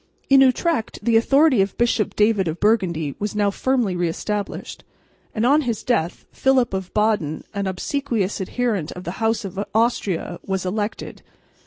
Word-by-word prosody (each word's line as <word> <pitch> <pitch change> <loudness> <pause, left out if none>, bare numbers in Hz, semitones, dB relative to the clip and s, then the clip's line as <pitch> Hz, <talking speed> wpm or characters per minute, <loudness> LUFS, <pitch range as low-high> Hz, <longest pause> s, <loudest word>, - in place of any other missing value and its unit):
In 270 0 +8
Utrecht 265 0 +1
the 230 0 +2
authority 270 +1 +4
of 195 0 -2
Bishop 235 -3 +1
David 210 -3 +2
of 160 +1 -3
Burgundy 175 -9 +1
was 210 0 -3
now 205 -1 +2
firmly 245 -4 0
re 175 -1 0
established; 205 +4 -4 0.5
and 220 +1 +1
on 290 +4 +4
his 235 -6 -3
death, 180 -9 -1
Philip 260 -5 +2
of 190 -1 -4
Baden, 210 -8 0
an 200 -1 -2
obsequious 210 0 -2
adherent 205 -5 -2
of 180 - -9
the 185 +4 -6
house 225 -1 +1
of 195 +1 -4
Austria, 220 -6 0
was 190 -1 -2
elected. 205 +3 -4
210 Hz, 160 wpm, -22 LUFS, 190-240 Hz, 0.5 s, In